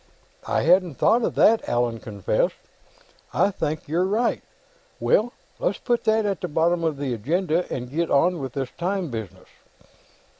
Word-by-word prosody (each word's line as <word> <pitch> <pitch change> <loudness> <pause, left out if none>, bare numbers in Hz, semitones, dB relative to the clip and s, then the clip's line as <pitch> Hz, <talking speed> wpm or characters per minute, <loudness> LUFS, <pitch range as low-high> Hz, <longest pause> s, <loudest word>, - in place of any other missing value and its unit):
"I - - +1
hadn't 175 -1 +3
thought 235 - +3
of - - -1
that," 225 +1 +4
Allan 120 -1 0
confessed. 100 -4 -1 0.8
"I 200 - +3
think 155 -4 -3
you're 165 +5 +1
right. 215 +6 0 0.6
Well, 235 +3 +2 0.3
let's - - 0
put 240 -2 -1
that 220 -1 +3
at 200 -2 -1
the 180 - -2
bottom 170 +2 +1
of 160 -3 0
the 140 -3 -2
agenda 165 - -1
and 125 -1 -4
get 165 +3 -1
on 170 +5 +3
with 135 -3 -5
this 135 -2 -3
time 180 -3 -1
business. 110 -6 -7
170 Hz, 160 wpm, -24 LUFS, 135-195 Hz, 0.8 s, that